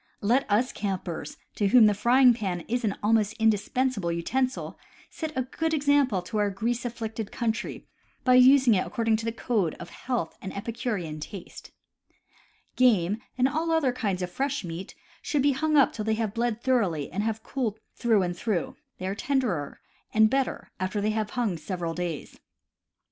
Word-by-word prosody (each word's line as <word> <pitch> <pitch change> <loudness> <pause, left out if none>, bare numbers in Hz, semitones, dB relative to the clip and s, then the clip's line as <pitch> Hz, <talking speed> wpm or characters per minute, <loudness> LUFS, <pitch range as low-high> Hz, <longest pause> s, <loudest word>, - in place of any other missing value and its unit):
Let 240 +6 +2
us 225 +5 +2
campers, 180 -6 -4 0.2
to 205 - +1
whom 230 +2 +7
the 210 - +5
frying 245 +5 +5
pan 190 -6 -3
is 240 +7 -2
an 205 -3 0
almost 215 -1 +3
indispensable 220 -2 +1
utensil, 255 +10 -2 0.3
set 315 -2 -4
a 260 - +2
good 320 +5 -1
example 280 - +2
to 210 +4 -3
our 205 -1 +2
grease 230 +5 -2
afflicted 225 -2 -4
country 225 -2 -3 0.4
by 255 - +4
using 255 -1 +7
it 185 - +1
according 225 -1 +1
to 225 - -5
the 230 - 0
code 220 -7 -1
of - - -10
health 245 -10 -3
and 190 +1 -6
epicurean 205 -8 -3
taste. 175 +4 -9 1.1
Game, 210 -5 +3 0.2
and 255 +1 +4
all 315 +4 -1
other 320 -6 +2
kinds 200 -7 -2
of 180 - -4
fresh 280 +2 -2
meat, 170 +2 -7 0.3
should 290 -3 0
be 285 - +4
hung 305 +3 +1
up 275 - +5
till 215 - -4
they 220 0 +1
have 220 -2 -2
bled 235 -1 -1
thoroughly 195 - +1
and 190 +6 -2
have 220 0 -2
cooled 235 -6 -2 0.2
through 225 -5 +2
and 175 -1 -2
through 185 -3 -2
— - - -53
they 185 - -6
are 190 - -1
tenderer 220 - -1 0.3
and 220 0 +5
better 270 -1 -1
after 185 +3 -1
they 210 +1 +1
have 215 -1 -1
hung 220 -8 0
several 170 +1 -4
days. 170 -3 -5
220 Hz, 180 wpm, -27 LUFS, 195-255 Hz, 1.1 s, whom